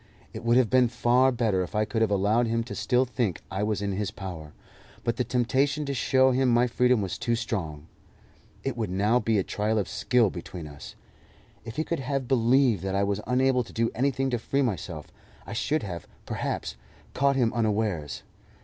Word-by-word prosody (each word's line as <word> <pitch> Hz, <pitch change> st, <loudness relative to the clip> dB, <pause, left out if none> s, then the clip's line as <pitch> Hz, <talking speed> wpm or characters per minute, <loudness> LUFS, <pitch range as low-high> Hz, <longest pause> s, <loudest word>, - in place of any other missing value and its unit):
It 110 Hz, -, -7 dB
would 120 Hz, +1 st, +4 dB
have 125 Hz, -4 st, +3 dB
been 130 Hz, -1 st, +5 dB
far 125 Hz, +2 st, +3 dB
better 115 Hz, -6 st, +1 dB
if 90 Hz, +3 st, -5 dB
I 105 Hz, 0 st, +2 dB
could 110 Hz, 0 st, -2 dB
have 110 Hz, -, +3 dB
allowed 105 Hz, +4 st, +2 dB
him 115 Hz, 0 st, 0 dB
still 125 Hz, +1 st, +1 dB
to 125 Hz, -, -19 dB
think 115 Hz, -9 st, -1 dB
I 95 Hz, +2 st, -2 dB
was 105 Hz, -1 st, -1 dB
in 100 Hz, -, -1 dB
his 100 Hz, +1 st, -2 dB
power, 85 Hz, -6 st, -8 dB, 0.5 s
but 115 Hz, -1 st, -1 dB
the 125 Hz, -, +1 dB
temptation 135 Hz, +5 st, +1 dB
to 140 Hz, -, -2 dB
show 130 Hz, +1 st, +3 dB
him 130 Hz, 0 st, +2 dB
my 120 Hz, +1 st, +4 dB
freedom 125 Hz, -2 st, +2 dB
was 95 Hz, -, -4 dB
too 120 Hz, -, 0 dB
strong. 85 Hz, -10 st, -4 dB, 0.8 s
It 135 Hz, -3 st, -2 dB
would 110 Hz, -5 st, -2 dB
now 105 Hz, +6 st, +2 dB
be 115 Hz, -3 st, +1 dB
a 95 Hz, -, +2 dB
trial 105 Hz, +3 st, -1 dB
of 100 Hz, -, 0 dB
skill 120 Hz, -5 st, +2 dB
between 85 Hz, -1 st, -7 dB
us. 75 Hz, -2 st, -10 dB, 0.7 s
If 115 Hz, 0 st, -7 dB
he 155 Hz, -, 0 dB
could 170 Hz, -1 st, -2 dB
have 135 Hz, -1 st, -2 dB
believed 125 Hz, -3 st, +3 dB
that 95 Hz, 0 st, -2 dB
I 100 Hz, -, +2 dB
was 100 Hz, +1 st, -1 dB
unable 125 Hz, 0 st, +2 dB
to 115 Hz, -, -14 dB
do 115 Hz, 0 st, 0 dB
anything 135 Hz, +1 st, 0 dB
to 120 Hz, -, 0 dB
free 140 Hz, +4 st, 0 dB
myself, 90 Hz, -, -4 dB, 0.3 s
I -, -, -7 dB
should 155 Hz, 0 st, 0 dB
have, 90 Hz, -5 st, -6 dB, 0.2 s
perhaps, -, -, -3 dB, 0.4 s
caught 140 Hz, +1 st, +2 dB
him 120 Hz, -4 st, +2 dB
unawares. 105 Hz, -9 st, -1 dB
115 Hz, 205 wpm, -27 LUFS, 100-125 Hz, 0.8 s, been